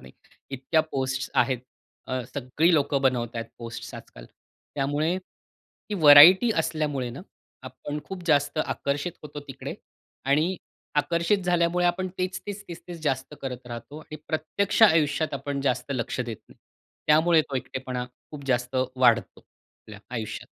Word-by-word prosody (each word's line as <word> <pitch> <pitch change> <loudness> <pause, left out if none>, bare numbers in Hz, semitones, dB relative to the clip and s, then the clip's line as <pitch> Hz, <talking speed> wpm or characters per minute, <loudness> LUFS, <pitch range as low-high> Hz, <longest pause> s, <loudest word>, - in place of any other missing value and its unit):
नाही. - - -14 0.4
इतक्या 135 +4 +1
पोस्ट्स 135 0 -2
आहेत. 130 -3 +2 0.5
अ, 130 -1 -2
सगळी 140 +6 +1
लोकं 145 -2 +2
बनवत 120 -3 0
आहेत 115 - -3
पोस्ट्स 115 -1 -7
आजकाल. - - -11 0.5
त्यामुळे 145 +4 0
ही 190 +2 -12
व्हरायटी 165 +7 +9
असल्यामुळे 150 -6 -1
ना, 125 - -8 0.4
आपण 130 +3 -6
खूप 190 +2 -7
जास्त 145 -1 +2
आकर्षित 145 +5 -2
होतो 150 -1 -8
तिकडे. 135 0 -6 0.5
आणि 155 +7 +2 0.4
आकर्षित 170 +6 +2
झाल्यामुळे 175 0 +2
आपण 185 +2 0
तेच, 185 +1 -2
तेच, 205 0 -5 0.3
तेच 175 -2 -7
जास्त 135 0 -2
करत 125 -2 -6
राहतो. 120 +5 -8
आणि 155 0 -9
प्रत्यक्ष 165 +7 0
आयुष्यात 160 -6 +4
आपण 140 +1 -3
जास्त 130 0 -1
लक्ष 120 +1 -3
देत 120 -3 -4
नाही. - - -19 0.5
त्यामुळे 160 +1 +5
तो 135 - -1
एकटेपणा 130 -1 -4 0.3
खूप 145 -2 -9
जास्त 125 0 0 0.2
वाढतो, 120 -2 +3
आपल्या 105 -2 -17
आयुष्यात. 110 -3 -5
145 Hz, 140 wpm, -26 LUFS, 130-165 Hz, 0.5 s, व्हरायटी